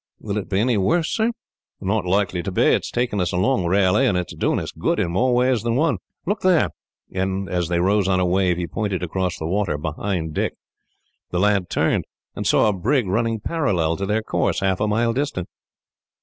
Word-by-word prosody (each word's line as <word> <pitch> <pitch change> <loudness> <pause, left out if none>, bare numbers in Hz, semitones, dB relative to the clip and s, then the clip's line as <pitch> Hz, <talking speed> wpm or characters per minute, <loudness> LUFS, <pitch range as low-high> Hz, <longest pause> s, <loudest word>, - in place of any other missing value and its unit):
"Will 105 -1 -3
it 100 - -7
be 95 - +1
any 120 +1 +2
worse, 130 - +1
sir?" 225 +1 +2 0.5
"Not 100 +1 -1
likely 95 -1 +1
to 95 - -4
be. - - +2
It - - +3
is - - -5
taking 120 -5 -1
us 90 - 0
along 95 +1 +1
rarely, 95 +7 +3
and 95 - +2
it 90 - -3
is - - -9
doing - - +1
us - - -5
good - - -1
in 85 - 0
more 125 +8 +2
ways 125 -2 +2
than 115 0 -1
one. 145 - +1 0.3
"Look 205 +3 -1
there;" 185 -3 +3 0.4
and 95 +1 -1
as 90 -2 -1
they 85 0 0
rose 100 +2 +2
on 95 -1 +2
a 90 - +2
wave, 90 -1 +2
he 90 - -2
pointed 95 +1 -3
across 90 +1 -2
the 80 - -5
water, 95 -2 0
behind 80 +1 -3
Dick. - - -1 0.7
The 90 - -1
lad 100 -2 +2
turned, - - +1 0.3
and - - -3
saw - - +4
a 105 - +2
brig 120 +7 +1
running 115 +3 0
parallel 95 - 0
to 100 - -3
their 110 +2 0
course, - - 0
half 95 -1 +1
a 105 - +1
mile 115 +2 +1
distant. 130 - -2
100 Hz, 220 wpm, -22 LUFS, 90-115 Hz, 0.7 s, saw